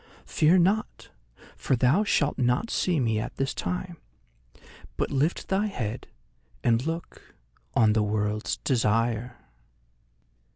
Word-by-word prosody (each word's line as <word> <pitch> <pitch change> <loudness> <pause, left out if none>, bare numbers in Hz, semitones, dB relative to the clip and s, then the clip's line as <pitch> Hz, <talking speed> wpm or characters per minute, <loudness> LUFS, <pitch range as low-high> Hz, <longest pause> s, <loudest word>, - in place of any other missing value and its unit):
Fear 160 +4 +3
not, 195 +5 0 0.4
for 130 - 0
thou 130 - +3
shalt 145 -10 +1
not 125 - +1
see 175 -4 +1
me 110 -4 +1
at 110 - -5
this 135 0 -1
time, 180 -1 -4 1.0
but - - -1
lift 145 +5 0
thy 195 +2 +1
head 120 - -4 0.6
and 115 0 +2
look 165 +1 -7 0.4
on 110 -2 +4
The 110 - +2
World's 105 +1 -1
Desire!" 115 -1 0
125 Hz, 120 wpm, -26 LUFS, 115-170 Hz, 1.0 s, on